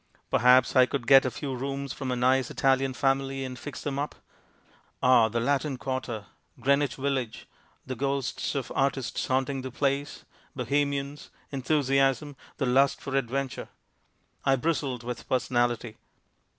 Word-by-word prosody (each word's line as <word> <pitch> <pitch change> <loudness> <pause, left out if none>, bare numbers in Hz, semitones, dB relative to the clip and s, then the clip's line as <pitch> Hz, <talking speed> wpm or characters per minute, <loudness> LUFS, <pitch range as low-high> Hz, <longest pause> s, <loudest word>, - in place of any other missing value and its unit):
Perhaps 125 +2 +5
I 130 -1 +6
could 130 -3 -3
get 135 +1 +7
a - - +1
few 135 +2 -5
rooms 140 +2 -4
from 135 -2 -5
a - - 0
nice 130 +1 +2
Italian 135 -1 +1
family 135 0 0
and 130 -1 -7
fix 145 - -7
them 140 -1 -2
up. 145 - -3 0.9
Ah, 125 -3 +6
the 115 +2 -1
Latin 140 +2 0
quarter, 125 -5 -4 0.3
Greenwich 140 +1 +2
village, 130 -4 -3 0.4
the 130 - -4
ghosts 140 +2 -2
of 135 - -3
artists 135 -2 -1
haunting 130 +1 0
the 130 - -5
place, 140 +2 -2 0.3
Bohemians, 140 +2 -1 0.2
enthusiasm, 135 0 +1 0.2
the 135 - 0
lust 135 +2 +3
for 140 - -5
adventure. 135 +1 -2 0.8
I 135 - +4
bristled 135 -3 -1
with 120 -1 -6
personality. 120 -2 0
135 Hz, 140 wpm, -27 LUFS, 125-140 Hz, 0.9 s, get